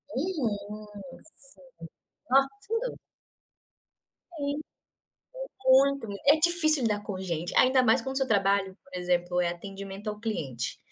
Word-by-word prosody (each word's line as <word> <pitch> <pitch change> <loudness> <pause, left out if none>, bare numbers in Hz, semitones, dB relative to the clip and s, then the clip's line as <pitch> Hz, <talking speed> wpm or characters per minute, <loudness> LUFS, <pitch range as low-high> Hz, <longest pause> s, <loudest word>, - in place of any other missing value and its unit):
Uhum, 215 - -3 0.5
sim, 275 0 -13 0.7
no 270 +2 +5 0.2
tudo. 455 +3 -2 1.4
Sim. 285 0 -2 1.1
Muito 275 -1 +4
me 200 - -5
é 290 +2 +7
difícil 315 -3 +4
lidar 210 -3 0
com 200 -3 -5
gente, 175 -2 -4
ainda 255 0 +5
mais 230 0 +3
quando 265 +1 -4
o - - +4
seu 270 - 0
trabalho, 195 -2 +1
por 280 - -17
exemplo, 180 0 0
é 175 - +1
atendimento 195 +3 -7
ao 210 0 -5
cliente. 140 - -4
215 Hz, 130 wpm, -28 LUFS, 195-275 Hz, 1.4 s, é